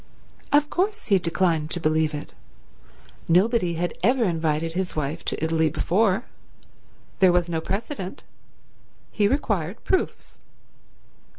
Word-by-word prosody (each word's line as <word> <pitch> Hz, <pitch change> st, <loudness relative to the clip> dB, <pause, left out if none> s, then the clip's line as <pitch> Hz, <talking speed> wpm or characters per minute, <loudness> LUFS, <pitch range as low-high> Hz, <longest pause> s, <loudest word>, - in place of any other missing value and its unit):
Of 295 Hz, +1 st, +3 dB
course 415 Hz, +5 st, -1 dB
he 195 Hz, -2 st, +5 dB
declined 165 Hz, -2 st, 0 dB
to 175 Hz, -, -2 dB
believe 155 Hz, -1 st, +1 dB
it. 145 Hz, -, -7 dB, 0.9 s
Nobody 180 Hz, 0 st, +3 dB
had 175 Hz, +2 st, -2 dB
ever 245 Hz, +6 st, +3 dB
invited 165 Hz, -3 st, 0 dB
his 185 Hz, +1 st, -2 dB
wife 150 Hz, +2 st, -3 dB
to -, -, -2 dB
Italy 160 Hz, -1 st, +2 dB
before. 195 Hz, -, +1 dB, 0.9 s
There 185 Hz, -2 st, +6 dB
was 175 Hz, -1 st, +2 dB
no 165 Hz, -2 st, -2 dB
precedent. 195 Hz, -, -4 dB, 0.9 s
He 205 Hz, -2 st, +2 dB
required 205 Hz, -, -1 dB
proofs. 375 Hz, -1 st, -2 dB
175 Hz, 120 wpm, -24 LUFS, 160-215 Hz, 0.9 s, There